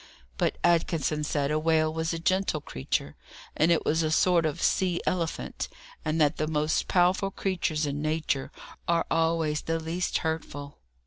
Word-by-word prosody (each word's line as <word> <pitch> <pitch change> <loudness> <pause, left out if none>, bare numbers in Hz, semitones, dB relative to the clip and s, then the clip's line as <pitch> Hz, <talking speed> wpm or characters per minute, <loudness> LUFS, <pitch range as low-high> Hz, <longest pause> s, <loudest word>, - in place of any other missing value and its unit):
But - - +1
Atkinson 165 -3 +2
said 145 -1 0
a 155 - +2
whale 155 0 +2
was 160 0 -1
a 165 - -2
gentle 185 -1 +1
creature, 65 - -3 0.4
and 165 +2 +3
it 165 - +2
was 160 +2 +2
a 155 - +1
sort 170 +1 +3
of 150 - -4
sea 180 -2 +2
elephant, 170 -3 -2 0.4
and 155 +1 -1
that 150 0 +3
the 155 - -1
most 155 0 0
powerful 185 +2 +3
creatures 175 -5 -1
in 145 0 -3
Nature 155 -3 -1 0.4
are 170 0 +2
always 165 -2 +1
the 165 0 -1
least 165 +3 -1
hurtful. 145 -3 -4
160 Hz, 165 wpm, -28 LUFS, 155-170 Hz, 0.4 s, and